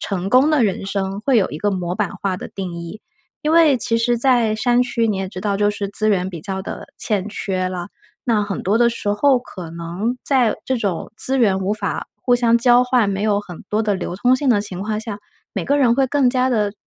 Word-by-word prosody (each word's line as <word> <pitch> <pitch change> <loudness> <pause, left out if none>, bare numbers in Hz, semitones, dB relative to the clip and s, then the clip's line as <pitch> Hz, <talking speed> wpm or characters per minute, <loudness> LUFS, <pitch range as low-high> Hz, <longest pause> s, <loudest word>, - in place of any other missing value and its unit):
成 195 -2 -3
功 260 +4 +5
的 295 -6 +3
人 195 -2 -1
生， 195 0 -2
会 260 +3 +2
有 205 - +3
一 150 - -5
个 205 +5 0
模 180 -2 -2
板 205 -2 -1
化 195 -2 0
的 - - -8
定 185 -3 -6
义。 170 +5 -8 0.4
因 305 - +1
为 320 -4 +5
其 230 -1 +1
实 240 +1 +1
在 240 -3 +3
山 245 +2 +2
区， 235 -2 0
你 210 - 0
也 190 -1 -3
知 185 - -9
道 205 0 -1
就 205 +1 +2
是 205 -1 -4
资 215 +2 +1
源 190 -3 +1
比 170 -3 -7
较 190 +3 -4
的 - - -7
欠 205 -2 0
缺 185 -3 -2
啦， 180 0 -5 0.4
那 225 -3 +2
很 200 -2 -4
多 205 +4 +1
的 240 0 +5
时 220 -3 -2
候 265 +5 +3
可 185 -8 -9
能 170 +8 -3
在 255 -5 +3
这 260 - 0
种 195 -5 -3
资 265 +4 +2
源 200 -6 +3
无 190 +2 0
法 - - -4
互 245 - +3
相 235 -1 +3
交 245 +1 +5
换， 250 -4 +2
没 195 +1 -2
有 210 -1 +2
很 180 -5 -11
多 215 +1 +1
的 210 -2 0
流 180 -1 -4
通 245 +6 +3
性 275 +1 -1
的 220 -5 +4
情 185 -3 -6
况 215 +1 -2
下， 220 -2 -6 0.3
每 - - -3
个 285 - +2
人 245 -4 +4
会 270 +1 +2
更 265 -1 +2
加 255 0 +1
地 210 -4 0
210 Hz, 265 characters per minute, -20 LUFS, 195-245 Hz, 0.4 s, 功